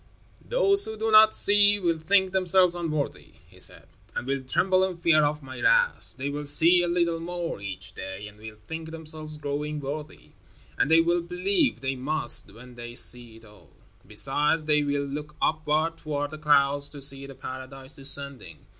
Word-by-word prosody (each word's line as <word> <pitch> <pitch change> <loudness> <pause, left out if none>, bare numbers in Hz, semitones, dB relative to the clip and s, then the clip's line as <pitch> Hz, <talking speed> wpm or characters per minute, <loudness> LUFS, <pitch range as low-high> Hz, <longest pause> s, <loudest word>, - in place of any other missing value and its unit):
"Those 400 -5 +3
who 220 0 -7
do 220 +1 -2
not 215 0 +6
see, 205 0 +4
will 170 -4 -1
think 190 +3 +1
themselves 185 -1 +2
unworthy," 155 -4 -5
he - - -20
said, - - +2 0.3
"and - - -4
will 135 +1 -3
tremble 185 +8 +1
in 185 -2 -3
fear 165 -3 +2
of 150 0 -2
my 130 -1 -10
wrath. - - +1
They 135 +1 -5
will 145 +1 -6
see 165 +5 +6
a 175 - -1
little 170 -1 -1
more 170 - -6
each 95 -1 -6
day 95 +1 -8
and 105 0 -16
will 110 0 -11
think 160 0 -8
themselves 155 -1 -8
growing 150 +1 -5
worthy. 150 +2 -8 0.4
And - - 0
they 165 +1 +5
will 170 +1 0
believe; 185 - -2
they 135 0 -3
must, 130 -5 +4
when 125 +4 -15
they 120 0 -10
see 120 -2 +2
it 115 0 -17
all. 105 -1 -20 0.4
Besides, 145 +8 0
they 150 -1 +1
will 145 -1 -2
look 150 +2 -8
upward, 155 +1 -1
toward 145 -2 -4
the 155 - -9
clouds, 145 -1 +3
to 145 - -9
see 140 0 0
the 135 - -12
paradise 130 +1 -5
descending. 135 - -2
150 Hz, 180 wpm, -25 LUFS, 135-170 Hz, 0.4 s, not